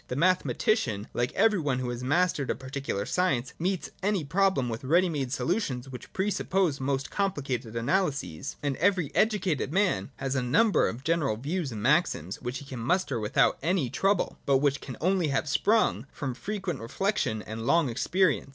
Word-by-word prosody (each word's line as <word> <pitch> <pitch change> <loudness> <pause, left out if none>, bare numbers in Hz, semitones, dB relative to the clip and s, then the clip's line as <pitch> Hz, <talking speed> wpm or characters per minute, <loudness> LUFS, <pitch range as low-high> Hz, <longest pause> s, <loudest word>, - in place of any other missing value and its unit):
The 125 - -4
mathematician, 170 - +1
like 120 +1 0
every 215 -3 +3
one 140 -5 0
who 125 -1 -2
has 120 0 -4
mastered 150 0 +1
a - - +1
particular 130 -6 -4
science, 135 -6 0
meets 185 +1 -1
any 200 -3 +1
problem 180 -3 +2
with 115 +1 -4
ready 175 +7 +3
made 140 -6 -2
solutions 140 - -1
which 125 -3 -9
pre 195 +2 0
suppose 185 -7 0
most 135 0 -1
complicated 135 - -2
analyses: 140 - -1
and 140 -2 0
every 185 -4 +2
educated 190 - +1
man 185 - +1
has 135 0 -3
a 130 - +1
number 195 - +3
of 120 +4 -7
general 155 -9 +1
views 150 +4 -2
and 105 -2 -5
maxims 130 - +1
which 125 +1 -3
he 145 - -9
can 130 -3 -7
muster 175 +2 0
without 105 -1 +2 0.3
trouble, 195 -1 +1
but 140 -1 +5
which 140 0 +1
can 130 - -8
only 185 0 +2
have 140 +1 0
sprung 145 - +2
from 135 -4 -4
frequent 195 - -4
reflection 115 - -1
and 115 +1 -6
long 165 -3 +4
experience. 165 +6 +1
140 Hz, 175 wpm, -28 LUFS, 125-185 Hz, 0.3 s, but